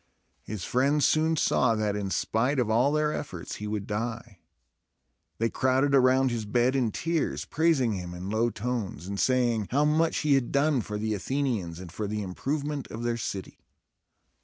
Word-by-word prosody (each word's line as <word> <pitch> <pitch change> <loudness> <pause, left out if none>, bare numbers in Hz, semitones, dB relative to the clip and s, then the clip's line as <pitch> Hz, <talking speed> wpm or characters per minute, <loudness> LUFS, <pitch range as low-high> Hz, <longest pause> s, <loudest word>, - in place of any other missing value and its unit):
His 105 -5 -6
friends 140 +6 +2
soon 160 +1 +3
saw, 125 -5 +2
that, 105 -1 0
in 100 -2 -2
spite 120 +8 0
of 120 -4 +1
all 125 +6 +3
their 150 0 +1
efforts, 90 - -6
he 105 - -5
would 105 -1 -3
die. 115 -1 -4 1.0
They 115 - +1
crowded 130 +2 +2
around 130 0 +4
his 115 -2 -2
bed 120 +5 +1
in 125 -4 +2
tears, 165 +6 -1
praising 150 -8 +2
him 90 -2 -5
in 90 +3 -5
low 115 +2 +2
tones, 115 -8 -4
and 100 +1 -4
saying 120 -5 +2
how 145 +4 +2
much 160 +2 +2
he 150 -2 +3
had 135 -3 +1
done 140 -1 +2
for 105 0 -5
the 110 +1 -1
Athenians 105 -7 -2
and 90 -3 -9
for 105 +4 -4
the 105 0 -3
improvement 140 +9 -3
of 115 - -7
their 120 0 0
city. 100 -5 -5
120 Hz, 180 wpm, -27 LUFS, 105-140 Hz, 1.0 s, around